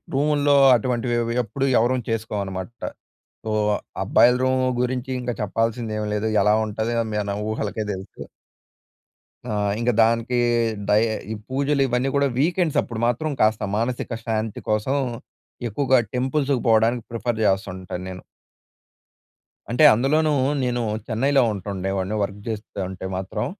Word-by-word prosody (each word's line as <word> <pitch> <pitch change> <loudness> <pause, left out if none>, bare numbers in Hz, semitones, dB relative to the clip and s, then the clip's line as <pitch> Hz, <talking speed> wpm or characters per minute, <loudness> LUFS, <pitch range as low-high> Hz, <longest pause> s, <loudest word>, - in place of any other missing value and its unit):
రూముల్లో 145 0 +3 0.2
అటువంటివి 120 0 0
అవి 115 0 -2
ఎప్పుడూ 135 +5 -2
ఎవరం 125 +2 +1
చేసుకోవనమాట. 100 -3 -3 0.7
సో, 110 - -2 0.5
అబ్బాయిల 125 +1 +5
రూమ్ 130 0 +2 0.2
గురించి 125 +1 -2
ఇంకా 120 -1 -3
చెప్పాల్సింది 115 +2 -1
ఏం 105 - -2
లేదు, 105 +1 -1
ఎలా 105 +1 +4
ఉంటది 110 +2 -2 0.3
మన 100 0 -3
ఊహలకే 110 0 -3
తెలుసు. 95 0 -9 1.2
ఆహ్, 105 -1 0
ఇంక 120 +1 +2
దానికి 115 +2 +2 0.5
డై 105 +1 +5 0.3
ఈ - - -1 0.2
పూజలు 140 +1 +1
ఇవన్నీ 125 +2 0
కూడా 140 0 +3
వీకెండ్స్ 170 +1 +1
అప్పుడు 115 -2 -6
మాత్రం 135 +6 -1
కాస్త 110 0 +3
మానసిక 120 +2 -2
శాంతి 110 -1 -2
కోసం 110 +6 +1 0.7
ఎక్కువగా 130 +4 +2 0.2
టెంపుల్స్‌కి 135 0 0
పోవడానికి 115 +1 +3
ప్రిఫర్ 115 -1 -2
జేస్తుంటాను 95 -2 -1
నేను... 90 -1 -8 1.5
అంటే 125 +6 +3
అందులోనూ 150 +6 +2 0.3
నేను 120 -1 0 0.3
చెన్నైలో 135 +5 +2
ఉంటుండేవాడిని 95 0 -3
వర్క్ 100 +1 -5
జేస్తుంటే 95 -4 -5
మాత్రం. 100 +4 -3
115 Hz, 120 wpm, -23 LUFS, 105-130 Hz, 1.5 s, అబ్బాయిల